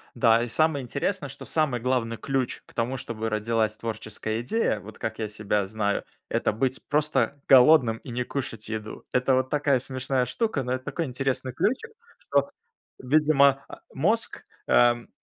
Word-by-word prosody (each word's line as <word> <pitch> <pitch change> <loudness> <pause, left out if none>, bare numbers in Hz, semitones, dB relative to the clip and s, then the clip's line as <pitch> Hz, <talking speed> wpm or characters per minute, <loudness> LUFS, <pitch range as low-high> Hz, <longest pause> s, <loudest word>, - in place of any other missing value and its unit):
Да, 115 -1 +4
и - - -3
самое 155 +3 +1
интересное, 140 +6 -2
что 135 +1 -10
самый 145 -7 0
главный 125 -2 0
ключ 135 +1 -2
к - - -20
тому, 120 +3 -1
чтобы 110 -3 -4
родилась 110 0 0
творческая 110 0 -4
идея, 125 - 0
вот 105 +1 -12
как 110 - -4
я 110 - -1
себя 105 -1 -1
знаю- 100 0 -1 0.2
это - - 0
быть 130 +4 -1
просто 150 -1 +1 0.2
голодным 130 -3 +7
и 125 - -10
не 125 +1 -1
кушать 115 -5 -5
еду. 110 -1 -6
Это 125 +1 +2
вот 130 0 0
такая 145 -2 +2
смешная 130 0 -1
штука, 185 - -1
но 125 - -4
это 130 +1 -2
такой 170 - -2
интересный 130 0 -2
ключик, 255 - -1 0.3
что, - - +1 0.5
видимо, 140 0 +3
а, - - -11
мозг, 215 +11 0 0.2
эм, 120 -1 +3
125 Hz, 165 wpm, -26 LUFS, 115-140 Hz, 0.5 s, голодным